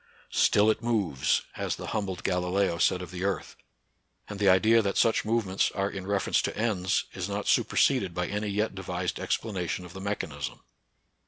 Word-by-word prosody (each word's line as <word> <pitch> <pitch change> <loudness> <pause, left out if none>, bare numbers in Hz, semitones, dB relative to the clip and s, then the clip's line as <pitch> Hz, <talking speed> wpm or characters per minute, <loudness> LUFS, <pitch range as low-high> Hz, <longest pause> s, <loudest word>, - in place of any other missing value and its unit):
" - - -28
Still 105 +1 +4
it 110 - -3
moves," 105 - +1
as - - -1
the - - -7
humbled 95 -4 -3
Galileo 90 -1 0
said 90 +1 +2
of 90 - -9
the 90 0 -5
earth; 100 0 -2 0.7
and 105 -2 -7
the 100 -2 +4
idea 110 +5 +5
that 100 -2 -1
such 115 - +3
movements 110 -4 +1
are 100 0 0
in 95 -1 -6
reference 100 -1 +1
to - - -3
ends 100 -4 0
is 90 +1 -4
not 100 0 -3
superseded 100 -11 +2
by 90 0 0
any 105 +2 -3
yet 105 +1 -1
devised 90 -2 -3
ex - - 0
planation 90 -4 -4
of 85 - -11
the 95 - -8
mechanism. 80 -8 -4
100 Hz, 185 wpm, -28 LUFS, 90-105 Hz, 0.7 s, idea